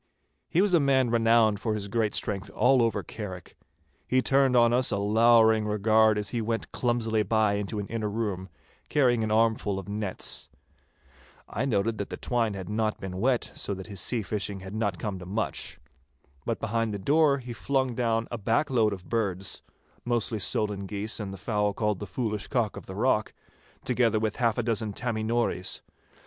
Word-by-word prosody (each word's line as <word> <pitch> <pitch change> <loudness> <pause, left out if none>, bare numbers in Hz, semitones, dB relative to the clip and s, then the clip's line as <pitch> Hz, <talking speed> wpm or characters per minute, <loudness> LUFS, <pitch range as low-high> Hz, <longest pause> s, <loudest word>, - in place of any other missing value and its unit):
He 180 - +3
was 205 -3 +1
a 170 - +6
man 135 -4 +3
renowned 115 -2 +4
for 110 -1 -1
his 100 -1 -4
great 110 0 0
strength 100 -2 -3
all 130 0 +4
over 115 -3 +1
Carrick. 95 -5 -8 0.5
He 130 0 +2
turned 135 -2 +3
on 120 0 +5
us 130 +2 +3
a 100 - +1
lowering 110 +1 +4
regard 110 +1 +3
as 105 -1 -2
he 120 - -1
went 115 +1 -3
clumsily 115 -3 0
by 110 0 +2
into 105 +1 -3
an 100 - -2
inner 110 0 -3
room, 100 -4 -3 0.4
carrying 125 -5 +3
an 110 - -1
armful 110 -2 +2
of 95 - -6
nets. 105 -2 -2 1.0
I - - -2
noted 110 -3 0
that 100 - -3
the - - -5
twine 115 -4 0
had 95 -2 -6
not 110 +1 -1
been 95 -1 -6
wet, 125 +2 +1
so 100 - -2
that 95 0 -8
his 100 -3 -5
sea 115 +1 -1
fishing 100 -1 -3
had 95 +1 -8
not 110 -2 -1
come 100 -4 -4
to 90 - -9
much. 105 +4 -2 0.7
But - - -1
behind 115 -1 -1
the - - -2
door 145 +7 +3
he 125 -2 -7
flung 130 +3 0
down 115 -1 0
a 120 - -4
back 115 +8 +1
load 110 -4 +3
of 95 -2 -9
birds—mostly 110 +2 -3
solan 100 0 -1
geese 105 +3 -3
and 100 -3 -4
the 95 - -7
fowl 105 +1 0
called 105 -2 -1
'the 105 - -6
Foolish 105 0 -3
Cock 120 -6 0
of - - -9
the 95 - -7
Rock,' 110 -1 +1 0.5
together 120 -3 +2
with 110 -1 -2
half 115 -2 +1
a 120 - 0
dozen 110 -2 -1
'Tammy 115 0 -2
Nories. 115 -5 -1
110 Hz, 190 wpm, -27 LUFS, 100-120 Hz, 1.0 s, a